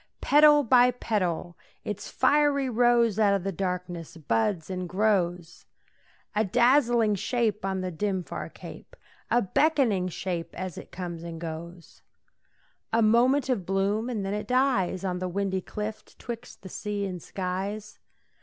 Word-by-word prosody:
Petal 295 0 +6
by 250 0 +5
petal 185 -8 -2 0.3
its 210 - -5
fiery 290 -2 +2
rose 235 -3 +3
Out 200 -2 +4
of 195 - -2
the 195 - -1
darkness 180 -3 -4
buds 155 - 0
and 185 -2 -4
grows; 180 -4 0 0.7
A 215 - +3
dazzling 240 0 +3
shape 215 0 -1
on 190 -1 -1
the 185 0 -3
dim, 190 +2 -2
far - - -6
cape, - - -12 0.3
A 240 +1 +3
beckoning 230 - +2
shape 175 -1 -4
as 185 -2 -5
it - - -10
comes 175 -2 -6
and 165 -1 -7
goes. 170 +1 -8 0.9
A 230 0 +3
moment 245 +5 +4
of 250 -8 0
bloom, 200 +5 0
and 215 -5 -3
then 195 - -2
it 210 0 -4
dies 250 -8 +1
On 180 -1 -2
the 185 0 -3
windy 190 0 -1
cliff 215 +3 -5
'twixt 235 -3 -8
the - - -8
sea 205 +1 -3
and 180 -3 -5
skies. 195 +4 -4
200 Hz, 150 wpm, -27 LUFS, 180-235 Hz, 0.9 s, Petal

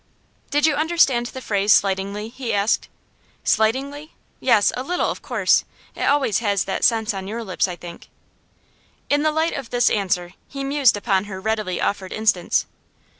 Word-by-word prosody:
'Did 290 +1 +2
you 315 - +3
understand 290 -6 +2
the 260 +1 -9
phrase 200 0 +1
slightingly?' 200 +2 +1
he 245 -1 -5
asked. 205 +1 +1 0.5
'Slightingly? 275 +8 0 0.2
Yes, 230 -5 +3
a 250 - -3
little, 355 +7 -1
of - - -8
course. - - +2 0.3
It - - -9
always 275 -8 +2
has 200 -4 +1
that 190 - -3
sense 220 -2 +2
on 190 -1 -6
your 230 +3 -4
lips, 190 -3 0
I 180 - -5
think.' 175 -1 -11 1.0
In 290 0 +3
the 310 0 +2
light 320 +2 0
of 270 -4 -6
this 245 -1 +2
answer 180 -3 -1
he 275 -1 -6
mused 275 -5 +3
upon 200 -2 0
her 190 -2 -7
readily 210 -3 -2
offered 190 -2 -2
instance. 210 -5 +1
220 Hz, 170 wpm, -22 LUFS, 200-275 Hz, 1.0 s, you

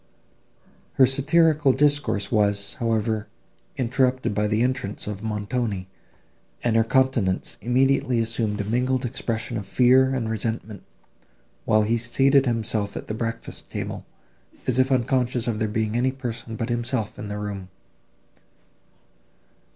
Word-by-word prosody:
Her 130 - +6
satirical 150 +1 +3
discourse 145 -7 +1
was, 100 -2 +1
however, 110 -1 0 0.5
interrupted 130 -1 +1
by 105 +1 +1
the 110 +2 +1
entrance 125 -5 -2
of 105 -1 -5
Montoni, 105 -2 -2 0.8
and 120 -2 +1
her 115 - +5
countenance 120 -6 +1
immediately 130 0 +2
assumed 115 -2 0
a - - 0
mingled 125 +4 0
expression 115 -1 -3
of 100 - -6
fear 130 +1 +4
and 120 -3 -2
resentment, 110 -2 -3 0.8
while 110 0 +3
he 115 +2 +1
seated 135 +4 +3
himself 110 -3 -1
at - - -8
the - - -2
breakfast 115 +1 -5
table, - - -5 0.6
as 130 0 0
if 130 +1 +3
unconscious 125 -1 +1
of 110 -2 -1
there 110 - 0
being 110 +1 -1
any 125 +2 +2
person 120 -3 -6
but 115 +1 -3
himself 120 -2 -2
in 105 - -5
the 105 0 -4
room. 100 -3 -5
115 Hz, 135 wpm, -24 LUFS, 105-130 Hz, 0.8 s, Her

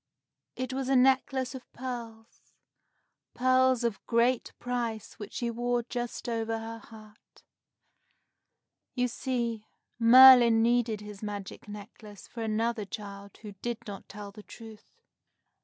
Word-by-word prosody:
It 255 0 -4
was 265 0 -3
a 270 - +3
necklace 260 0 +2
of 260 -1 -11
pearls, 235 -3 -8 0.8
pearls 255 0 +3
of 230 -4 -2
great 235 +1 +1
price 235 -3 -4
which 205 - -8
she 235 -1 -2
wore 240 +1 -1
just 240 0 -5
over 225 -1 -2
her 225 0 -7
heart. 215 -2 -17 1.5
You 250 -1 +1
see, 235 -3 -3 0.3
Merlin 240 -1 +8
needed 235 -2 +1
his 210 -1 -10
magic 205 -2 -7
necklace 210 -1 -11
for 235 - -8
another 225 0 -1
child 200 -1 -9
who 210 - -7
did 240 -1 -2
not 200 -2 -9
tell 205 -1 -9
the 210 +1 -12
truth. 220 0 -13
230 Hz, 125 wpm, -29 LUFS, 215-245 Hz, 1.5 s, Merlin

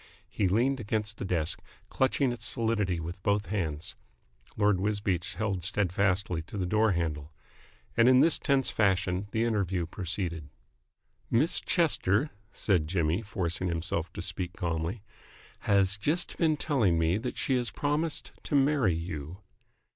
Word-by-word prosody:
He 100 - +1
leaned 125 +8 +2
against 110 -1 -2
the - - -4
desk, 85 -3 -2 0.3
clutching 130 0 +1
its 120 - -2
solidity 105 -6 0
with 85 +3 -6
both 100 +2 +1
hands. 80 -7 -2 0.6
Lord 105 -2 +3
Wisbeach 100 -4 -1
held 100 -5 -2
steadfastly 95 -2 0
to 85 +6 -9
the 95 - -1
door 110 +3 +3
handle. 80 -3 -2 0.6
And 115 +2 +6
in 130 0 +6
this 165 +3 +4
tense 135 -2 +2
fashion 95 -1 +1
the 110 +2 0
interview 95 -6 0
proceeded. 85 -3 -4 0.8
"Miss 145 +9 +3
Chester," 150 - +2 0.2
said 90 -7 +1
Jimmy, 85 +2 +1
forcing 95 -4 -2
himself 85 -1 -2
to - - -5
speak 90 -1 -4
calmly, 85 +4 -3 0.7
"has 100 -1 +4
just 150 - -1
been 155 -3 +2
telling 115 - +2
me 80 +4 +2
that 125 +2 -5
she 135 - +1
has 120 -1 -1
promised 150 +2 -1
to - - -1
marry 135 - +3
you." 80 0 -5
100 Hz, 145 wpm, -29 LUFS, 85-115 Hz, 0.8 s, And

